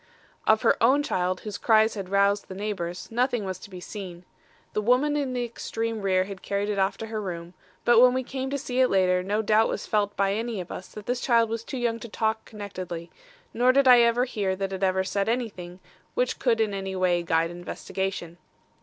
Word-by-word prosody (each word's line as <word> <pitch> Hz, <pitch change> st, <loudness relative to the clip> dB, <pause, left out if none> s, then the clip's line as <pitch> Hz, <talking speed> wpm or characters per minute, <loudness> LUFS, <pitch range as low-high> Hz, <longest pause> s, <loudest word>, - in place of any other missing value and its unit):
"Of 220 Hz, 0 st, +4 dB
her -, -, +3 dB
own 265 Hz, +5 st, +4 dB
child, 185 Hz, -7 st, -1 dB
whose 210 Hz, -2 st, -6 dB
cries 220 Hz, -1 st, +4 dB
had 195 Hz, -3 st, -6 dB
roused 200 Hz, +1 st, +2 dB
the 190 Hz, -, -8 dB
neighbours, 190 Hz, -4 st, -4 dB
nothing 245 Hz, -2 st, 0 dB
was 185 Hz, -1 st, -4 dB
to 200 Hz, -, -11 dB
be 185 Hz, -2 st, -9 dB
seen. 180 Hz, -2 st, -8 dB, 0.5 s
The 210 Hz, -, 0 dB
woman 255 Hz, +7 st, +3 dB
in 280 Hz, -3 st, -1 dB
the 245 Hz, -1 st, -1 dB
extreme 225 Hz, -1 st, -4 dB
rear 185 Hz, -1 st, +2 dB
had 190 Hz, 0 st, -8 dB
carried 200 Hz, +1 st, -2 dB
it 205 Hz, -1 st, -1 dB
off 195 Hz, 0 st, +1 dB
to 225 Hz, -, -5 dB
her 220 Hz, -1 st, -4 dB
room; 175 Hz, -3 st, -6 dB, 0.3 s
but 240 Hz, -1 st, +6 dB
when 250 Hz, 0 st, +6 dB
we 260 Hz, -, 0 dB
came 265 Hz, +1 st, -4 dB
to 280 Hz, -, -1 dB
see 255 Hz, -2 st, -3 dB
it 260 Hz, -, +6 dB
later, 185 Hz, -1 st, +3 dB
no 205 Hz, +4 st, -1 dB
doubt 220 Hz, +1 st, +3 dB
was -, -, -3 dB
felt 205 Hz, -1 st, 0 dB
by 195 Hz, 0 st, +2 dB
any 225 Hz, 0 st, -2 dB
of 180 Hz, -, -7 dB
us 185 Hz, -, -7 dB
that 210 Hz, -1 st, -10 dB
this 245 Hz, 0 st, -1 dB
child 230 Hz, -3 st, +3 dB
was 230 Hz, 0 st, -3 dB
too 265 Hz, -, -6 dB
young 235 Hz, -2 st, -1 dB
to 235 Hz, -, -8 dB
talk 220 Hz, +1 st, -1 dB
connectedly, 185 Hz, -5 st, -7 dB, 0.4 s
nor 245 Hz, +2 st, +4 dB
did 275 Hz, +1 st, +3 dB
I 250 Hz, -1 st, +9 dB
ever 235 Hz, +1 st, +3 dB
hear 205 Hz, -7 st, -1 dB
that 195 Hz, 0 st, -3 dB
it 190 Hz, -, -5 dB
ever 190 Hz, -1 st, +2 dB
said 200 Hz, +2 st, -1 dB
anything 200 Hz, -7 st, -3 dB, 0.4 s
which 250 Hz, 0 st, 0 dB
could 235 Hz, -3 st, +2 dB
in 215 Hz, -2 st, +1 dB
any 195 Hz, -1 st, -4 dB
way 180 Hz, -2 st, +2 dB
guide 165 Hz, 0 st, +1 dB
investigation. 175 Hz, 0 st, -5 dB
205 Hz, 225 wpm, -26 LUFS, 190-235 Hz, 0.5 s, I